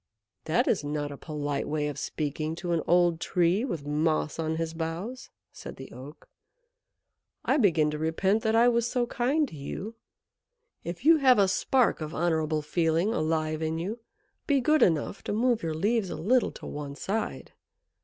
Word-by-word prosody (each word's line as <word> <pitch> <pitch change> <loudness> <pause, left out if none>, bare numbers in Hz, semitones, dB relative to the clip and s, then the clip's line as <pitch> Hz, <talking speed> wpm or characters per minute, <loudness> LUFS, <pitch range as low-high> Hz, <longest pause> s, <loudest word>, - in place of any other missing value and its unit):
"That 160 - +1
is - - +1
not 145 0 -3
a - - -6
polite 145 -2 -3
way 150 -1 -1
of 145 -1 -5
speaking 155 +1 -3
to 175 0 -4
an 165 -1 +1
old 175 -1 +3
Tree 180 +4 +1
with 170 - -4
moss 155 +1 0
on 160 0 -1
his 165 0 -3
boughs," 170 +10 -5 0.2
said - - -9
the 135 - -10
Oak. 135 +6 -11 1.2
"I - - +3
begin 165 - +3
to 150 - -4
repent 190 +7 +1
that 220 0 +1
I 235 +1 +6
was 235 -1 +2
so 245 -1 0
kind 270 +6 +1
to - - -11
you. 185 +9 -6 0.9
If 170 +9 -6
you 325 +1 +7
have 260 -4 +5
a 200 -1 +5
spark 245 +2 +2
of 155 +1 -5
honourable 160 -2 0
feeling 165 +6 +1
alive 155 -4 -1
in 160 0 -1
you, 200 +8 -4 0.5
be 285 -2 +3
good 305 +3 +3
enough 165 0 +2
to - - -2
move 235 +1 +2
your 160 -2 -2
leaves 205 +4 +1
a - - -4
little 245 +8 +2
to - - -10
one 145 -1 -6
side. 205 +8 -3
165 Hz, 180 wpm, -28 LUFS, 155-225 Hz, 1.2 s, you